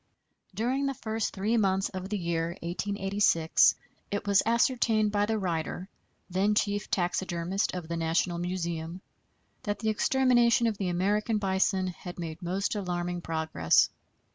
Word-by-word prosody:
During 255 +7 0
the 275 - -2
first 220 -1 -2
three 210 +4 0
months 195 -2 +1
of 185 0 -6
the 210 - -1
year 170 -1 -2
1886 195 -2 +2 0.3
it 205 0 -3
was 200 -1 +4
ascertained 230 -2 +2
by 205 0 +1
the 220 0 0
writer, 180 0 -3 0.4
then 195 +3 +1
chief 205 0 0
taxidermist 180 +1 -1
of 175 -3 -5
the 170 0 -3
National 165 +1 0
Museum, 170 -1 -3 0.6
that 205 -1 -2
the 220 - -1
extermination 240 0 +3
of 220 -3 -1
the 190 -3 -1
American 205 +5 +1
bison 190 -1 +1
had 180 0 -7
made 165 0 -6
most 185 +3 -1
alarming 175 -3 -3
progress. 160 - +2
190 Hz, 140 wpm, -28 LUFS, 175-210 Hz, 0.6 s, was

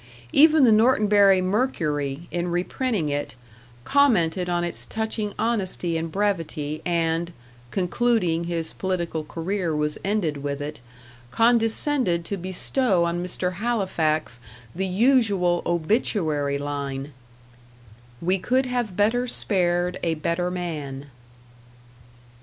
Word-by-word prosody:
Even 310 0 +6
the 240 - +6
Norton 220 +1 +4
Bury 200 -2 +5
Mercury, 160 - -1
in 175 0 -2
reprinting 180 - -1
it, 145 -4 -3 0.5
commented 185 - +2
on 175 0 0
its 175 - -4
touching 220 -2 -3
honesty 190 -7 -1
and 165 0 -3
brevity, 165 -6 -2
and 170 0 0 0.4
concluding 180 - +1
his 170 -1 -3
political 175 -4 -2
career 170 +1 -2
was 150 0 -1
ended 195 -7 0
with 140 0 -4
it 145 -3 -6 0.5
condescended 225 - +2
to 200 - -3
bestow 185 +2 0
on 170 +1 -1
Mr. 180 0 -2
Halifax 170 - 0 0.3
the 190 +2 -2
usual 200 -5 +2
obituary 160 - 0
line 140 -1 -4 1.1
"We 185 +3 +1
could 255 +7 +1
have 245 -7 -2
better 235 +4 +2
spared 180 -5 0
a 165 -2 0
better 170 +3 -1
man." 150 -6 -5
180 Hz, 110 wpm, -24 LUFS, 160-215 Hz, 1.1 s, Even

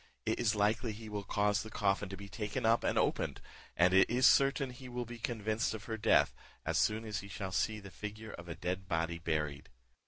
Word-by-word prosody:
It 110 - 0
is 115 -2 +2
likely 105 +2 +1
he 110 +1 -9
will 105 -1 -3
cause 105 +1 +1
the 110 - -7
coffin 100 -1 0
to 95 - -6
be 100 +1 -8
taken 105 +2 -3
up 115 +1 +4
and - - +1
opened, - - +1 0.4
and 90 +2 +5
it 95 0 +6
is 125 +2 +3
certain 135 -1 +4
he 125 +1 -10
will 125 0 -3
be 120 0 -9
convinced 110 -1 -1
of 105 - -8
her 115 - -3
death, 110 +1 +4 0.3
as - - +1
soon 110 +1 +1
as 105 0 -3
he 100 - -8
shall 95 -1 -5
see 110 +3 0
the 100 -2 -11
figure 105 +2 -7
of 85 0 -9
a 85 - -4
dead 90 +3 -3
body 85 -1 -1
buried. 75 -3 -2
105 Hz, 225 wpm, -34 LUFS, 95-110 Hz, 0.4 s, it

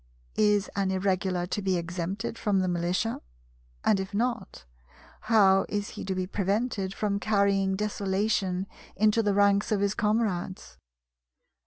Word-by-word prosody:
Is 210 -1 +3
an 195 -1 0
Irregular 185 -1 0
to 195 +3 -3
be 190 -2 +1
exempted 180 +6 -4
from 210 -3 0
the 185 - 0
militia? 180 +5 -1 0.6
And 195 - +3
if 190 +1 -5
not, 235 - -2 0.6
how 195 -4 +5
is 205 0 -2
he - - -7
to 190 0 -2
be 185 0 -1
prevented 200 +1 -1
from 200 -1 -1
carrying 200 -2 +2
desolation 195 -2 -1 0.3
into 215 +1 +3
the 205 -2 +1
ranks 200 +1 +3
of 210 - +2
his 200 0 +1
comrades? 210 -4 -1
200 Hz, 140 wpm, -27 LUFS, 190-210 Hz, 0.6 s, how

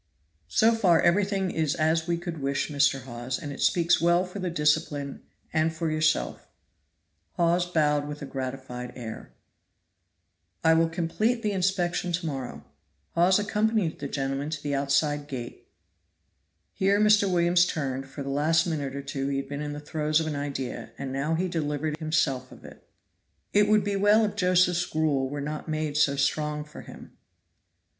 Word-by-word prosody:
"So 225 - +4
far 185 -7 +4
everything 195 0 +2
is 155 -3 0
as 160 +1 +1
we 170 -1 +1
could 170 -3 -6
wish, 140 +2 -1
Mr. 140 -2 +2
Hawes, 120 +1 -4
and 145 -3 -6
it 140 - -7
speaks 170 -1 +3
well 175 +2 +3
for 185 +2 -8
the 185 -1 -2
discipline 150 -3 0 0.3
and 160 0 +2
for 160 0 -2
yourself." 155 0 0 0.9
Hawes 175 +1 +2
bowed 150 -4 +1
with 150 0 -6
a - - -4
gratified 130 -2 -6
air. 115 -3 -8 1.3
"I 160 0 +6
will 165 0 +3
complete 215 +8 0
the 210 - +1
inspection 180 -2 0
to 170 0 -1
morrow." 135 -5 -5 0.5
Hawes 180 +2 +4
accompanied 210 -3 0
the 140 - -4
gentlemen 135 +1 -2
to 155 -2 -5
the 145 -1 -2
outside 145 +1 +1
gate. 125 -4 -7 1.1
Here 195 +1 +2
Mr. 210 -2 +4
Williams 175 0 +4
turned. 135 -5 -3
For 140 +1 -6
the 135 - -5
last 155 +3 +2
minute 145 -5 -3
or 140 - -5
two 135 0 -3
he 140 -1 -1
had 135 0 -3
been 145 0 -4
in 150 0 -4
the 145 - -6
throes 150 +1 0
of 160 - -1
an 155 -2 -3
idea, 140 -5 -4
and 135 -1 -5
now 145 +4 0
he 180 +3 0
delivered 155 -2 -2
himself 135 -5 0
of - - -14
it. - - -14 0.6
"It 205 0 +5
would 210 -1 +4
be 200 0 -1
well 210 +2 +5
if 205 0 -3
Josephs' 180 -2 +3
gruel 145 -4 0
were 145 +1 -4
not 150 +3 -5
made 155 -1 -2
so 150 -2 +3
strong 150 +2 0
for 150 - -11
him." - - -13
155 Hz, 175 wpm, -27 LUFS, 140-175 Hz, 1.3 s, I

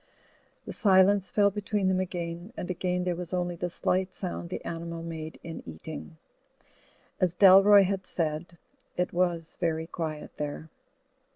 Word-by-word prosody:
The - - -6
silence 195 -2 +4
fell 200 -1 +3
between 205 -1 -1
them 185 0 +2
again, 175 +2 -4
and 180 - -3
again 180 0 -1
there 180 -1 0
was 180 +1 -4
only 175 -1 -1
the 175 +1 -3
slight 185 +2 -1
sound 175 -2 -5
the - - -6
animal 170 0 -5
made 160 -1 -6
in 165 -1 -7
eating. 155 - -9 1.0
As 180 -3 +1
Dalroy 195 +1 +8
had 195 0 -2
said, 165 +1 -3 0.4
it 180 - 0
was 175 -2 -1
very 160 -2 0
quiet 160 -2 -5
there. 150 +1 -5
175 Hz, 150 wpm, -28 LUFS, 165-185 Hz, 1.0 s, Dalroy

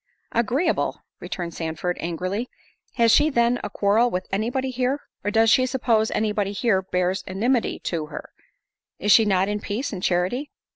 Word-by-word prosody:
"Agreeable!" 240 +8 0 0.2
returned 170 -2 -5
Sandford, 165 +2 -3
angrily—"Has 200 +6 -2
she 295 +5 +5
then 240 -2 +2
a 210 - -3
quarrel 210 +4 +2
with 185 -3 -3
any 215 +4 0
body 260 +1 -2
here? 255 +3 -1 0.2
or 205 - 0
does 225 +1 +4
she 255 +2 +4
suppose 235 -4 +1
any 215 0 0
body 205 -1 -1
here 205 -3 +1
bears 185 +1 -1
enmity 230 +6 0
to 160 -3 -2
her? - - -9 0.7
Is 205 - +1
she 225 - +7
not 190 -2 +2
in 210 0 -1
peace 220 +6 -3
and 185 - -5
charity?" 185 +12 0
210 Hz, 165 wpm, -24 LUFS, 185-245 Hz, 0.7 s, she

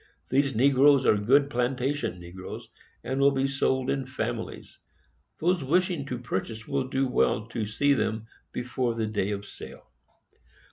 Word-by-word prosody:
These 135 -1 +2
Negroes 135 +2 +5
are - - +5
good 135 +8 +4
Plantation 125 -3 -1
Negroes, 90 +2 -9 0.3
and 130 +3 -2
will 140 0 +6
be 135 -1 0
sold 130 -1 0
in 135 -2 -2
families. 120 -3 -5 0.6
Those 175 -1 +1
wishing 170 0 +1
to 125 - -3
purchase 110 -1 -4
will 135 -2 -1
do 135 0 0
well 110 -3 +1
to 115 -3 -3
see 140 +7 +2
them 110 -4 -1 0.3
before 125 -1 -2
the 115 -1 -1
day 105 -2 -1
of 100 0 -3
sale. - - -11
130 Hz, 150 wpm, -27 LUFS, 110-140 Hz, 0.6 s, will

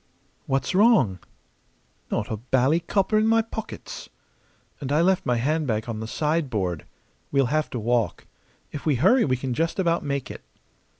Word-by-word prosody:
"What's 135 -1 0
wrong?" 190 - +4 0.9
"Not 105 +3 -2
a 110 - -2
bally 130 +7 +2
copper 195 +5 +1
in 215 - +2
my 225 0 +4
pockets!" 220 0 -8 0.7
"And 140 -2 -4
I 150 +3 +3
left 185 +1 +2
my 125 -1 +2
handbag 130 -4 0
on 115 -2 -4
the 110 - -5
sideboard! 115 - -1 0.4
We'll 140 -1 +3
have 155 0 +1
to 125 - -4
walk. 120 0 0 0.5
If 145 - -6
we 150 -3 +2
hurry 195 - +4
we 130 -2 +1
can 130 0 -3
just 165 +6 -1
about 170 -3 +1
make 140 -2 -3
it." - - -9
140 Hz, 165 wpm, -25 LUFS, 120-170 Hz, 0.9 s, wrong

